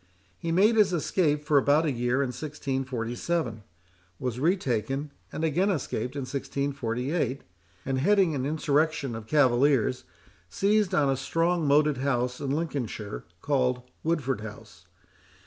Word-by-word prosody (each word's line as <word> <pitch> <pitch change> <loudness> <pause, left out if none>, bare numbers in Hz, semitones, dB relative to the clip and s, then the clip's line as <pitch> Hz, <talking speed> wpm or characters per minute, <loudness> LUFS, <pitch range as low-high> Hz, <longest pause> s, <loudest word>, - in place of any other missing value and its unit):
He 165 -1 -2
made 210 +7 +4
his 200 -4 +4
escape 150 -3 +1
for 145 -2 +5
about 145 +4 +3
a 150 - +1
year 125 +2 +1
in 135 - -2
1647; 130 -1 -3 0.6
was 125 +2 -3
retaken, 140 - 0 0.2
and 160 - -4
again 170 +6 +2
escaped 130 - -2
in 140 - -2
1648. 135 +1 -2 0.4
and 130 0 0
heading 190 +2 +3
an 135 -3 -2
insurrection 150 -2 0
of 110 -1 -7
cavaliers, 130 -3 +3 0.5
seized 205 - +2
on 140 -2 +3
a - - +1
strong 165 +4 0
moated 150 0 +4
house 125 -2 -1
in 140 - -2
Lincolnshire, 135 -9 -3 0.2
called 125 -3 +1 0.2
Woodford 140 -8 0
House. 105 -5 -11
140 Hz, 130 wpm, -27 LUFS, 125-155 Hz, 0.6 s, for